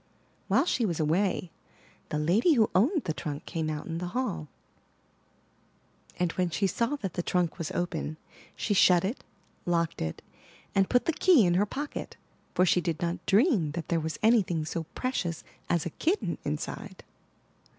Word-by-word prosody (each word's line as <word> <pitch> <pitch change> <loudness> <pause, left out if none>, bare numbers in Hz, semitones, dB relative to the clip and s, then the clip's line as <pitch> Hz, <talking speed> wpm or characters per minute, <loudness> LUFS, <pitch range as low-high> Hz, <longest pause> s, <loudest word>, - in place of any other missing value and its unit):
While - - +3
she 260 - +1
was 175 -7 0
away, 175 +3 +1 0.6
the 150 - -1
lady 185 - +3
who 225 -6 +3
owned 280 - +3
the 160 - -2
trunk 145 +1 -5
came 160 -2 -2
out 150 -1 -4
in 165 -1 -4
the 180 - -3
hall; 200 -12 -2 1.7
and 175 -2 +1
when 180 0 0
she 195 +4 0
saw 235 +9 0
that 195 - -5
the 175 - -1
trunk 175 -1 0
was 165 - -3
open, 165 -3 -2 0.4
she 210 - -1
shut 180 -2 +5
it, 220 +8 -3 0.4
locked 170 -1 0
it, 80 0 -4 0.5
and 195 -1 +3
put 245 - +3
the 330 - +1
key 315 - +5
in 175 - +3
her 200 +4 +2
pocket, 290 +7 -5 0.4
for 180 - +4
she 180 0 +3
did 165 -3 -2
not 170 0 -2
dream 200 - +3
that 170 0 -5
there 170 - +2
was 160 0 -3
anything 195 -8 +3
so 160 +1 -3
precious 185 -11 -2 0.3
as 170 -3 +1
a 170 - -3
kitten 350 - -1
inside. - - -5
175 Hz, 170 wpm, -28 LUFS, 165-220 Hz, 1.7 s, shut